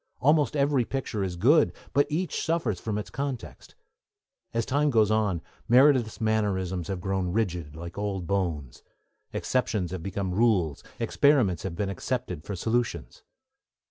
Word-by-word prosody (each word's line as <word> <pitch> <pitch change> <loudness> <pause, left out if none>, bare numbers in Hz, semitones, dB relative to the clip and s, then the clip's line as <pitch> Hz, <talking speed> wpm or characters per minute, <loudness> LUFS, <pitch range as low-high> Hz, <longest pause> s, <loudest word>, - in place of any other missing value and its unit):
Almost 150 0 +3
every 140 -2 +2
picture 115 -5 -3
is 90 -2 -3
good, 140 - +4 0.2
but 145 - +3
each 175 +4 -1
suffers 155 - 0
from 105 -2 -3
its 105 - -5
context. 135 -3 -5 0.8
As 115 -1 -1
time 145 +2 +2
goes 110 -5 +3
on, 105 -7 +1 0.3
Meredith's 125 -2 +5
mannerisms 95 -5 0
have 95 -2 -3
grown 95 0 -1
rigid, 90 -8 -2
like 85 +4 -7
old 100 -3 -2
bones. 85 -9 -2 0.5
Exceptions 105 -8 -1
have 95 -2 -4
become 95 0 -3
rules, 95 -9 +2 0.2
experiments 125 - +3
have 95 -3 -4
been 100 +1 -1
accepted 95 -4 -3
for 100 - -5
solutions. 115 +6 -2
105 Hz, 140 wpm, -27 LUFS, 90-125 Hz, 0.8 s, Meredith's